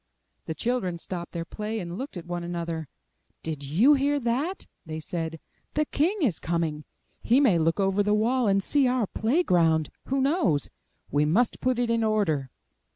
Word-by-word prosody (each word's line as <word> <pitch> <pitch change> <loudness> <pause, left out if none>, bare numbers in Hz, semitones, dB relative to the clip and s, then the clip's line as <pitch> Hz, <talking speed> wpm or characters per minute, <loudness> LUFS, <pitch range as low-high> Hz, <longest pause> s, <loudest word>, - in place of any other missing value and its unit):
*' - - -49
The 160 - -3
children 230 -7 -1
stopped 175 0 -6
their 165 -1 -4
play, 215 +4 -4
and 175 -2 -5
looked 260 -1 -6
at 170 - -7
one 175 0 -4
another. 170 -2 -4 0.6
Did 155 -3 -4
you 185 - +5
hear 285 +1 +2
that?'' 275 +10 -1 0.2
they 155 -1 -6
said. 165 0 -4 0.4
'The 305 +1 +2
King 355 +5 +1
is 200 - +1
coming. 160 -3 -2 0.4
He 245 +4 +4
may 220 -12 +4
look 165 +4 +1
over 195 +1 +2
the 210 +1 +2
wall 240 +3 +2
and 195 0 +2
see 280 +2 +3
our 250 -3 +1
play 240 - +1
ground; 160 - +2
who 270 +1 0
knows? 260 - +1 0.4
We 145 +1 +3
must 215 +11 +1
put 255 -1 +1
it 240 -1 +1
in 230 -1 +2
order." 195 -11 +1
195 Hz, 185 wpm, -26 LUFS, 165-250 Hz, 0.6 s, you